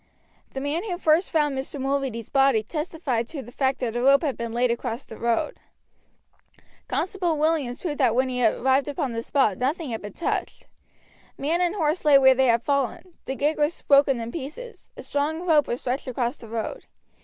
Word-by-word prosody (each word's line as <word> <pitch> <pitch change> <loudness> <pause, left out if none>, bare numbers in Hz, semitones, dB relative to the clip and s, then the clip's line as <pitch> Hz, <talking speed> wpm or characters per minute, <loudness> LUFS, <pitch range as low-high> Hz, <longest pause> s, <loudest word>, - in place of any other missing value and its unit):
The 270 - -3
man 295 +6 -2
who 360 -5 -3
first 325 +1 +3
found 295 -4 +1
Mr. 270 +2 -5
Mulready's 270 -4 -2
body 270 -5 +3
testified 300 -4 -3
to 280 -2 -6
the 240 - -12
fact 265 0 0
that 235 -2 -2
a 240 - 0
rope 275 +4 +5
had 285 -4 0
been 235 -1 -5
laid 240 +1 +1
across 235 +1 -4
the 220 - -10
road. 235 - -1 1.3
Constable 360 -4 -1
Williams 295 -5 0
proved 305 -5 -4
that 230 - +3
when 260 +1 +2
he 250 -1 -2
arrived 265 +5 +2
upon 280 -3 -2
the 230 - -2
spot 230 -6 +1
nothing 285 +2 -1
had 225 - -4
been 205 - -8
touched. 340 - -3 0.7
Man 325 +5 0
and 355 +2 +1
horse 320 -2 0
lay 295 -3 +7
where 265 -1 +7
they 260 0 +2
had 235 0 +3
fallen, 280 +5 -1
the 265 - -3
gig 300 +3 0
was 300 +3 +1
broken 275 -3 +4
in 230 0 -5
pieces, 335 - -8
a - - -8
strong 310 +4 -2
rope 310 -5 +4
was 240 - -3
stretched 260 +3 -3
across 245 0 -1
the 230 - -13
road. 230 - -4
275 Hz, 200 wpm, -25 LUFS, 245-310 Hz, 1.3 s, lay